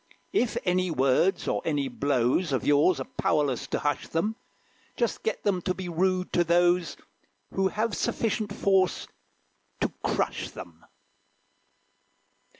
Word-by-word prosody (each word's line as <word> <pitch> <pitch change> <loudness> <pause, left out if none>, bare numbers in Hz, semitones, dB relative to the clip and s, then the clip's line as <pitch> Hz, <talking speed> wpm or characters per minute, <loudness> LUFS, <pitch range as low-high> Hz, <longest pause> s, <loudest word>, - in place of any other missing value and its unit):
If 250 - +1
any 185 0 +1
words 135 +5 +2
or - - 0
any 145 -4 0
blows 140 +4 +1
Of 130 - -1
yours 145 +5 +4
are - - -2
powerless 140 -3 0
to - - -1
hush 145 -2 -1
them, 210 +7 -1 0.6
Just 235 -2 -1
get 220 - -2
them 190 -3 +1
to 185 +1 -1
be 185 -1 -5
rude 185 +2 0
to 175 - +4
those 175 +1 +2 0.6
Who 190 0 +2
have 215 +2 -1
sufficient 215 -2 -1
force 190 -2 +1 0.7
to - - -1
crush - - -1
them. 80 -2 -11
175 Hz, 135 wpm, -27 LUFS, 145-190 Hz, 0.7 s, yours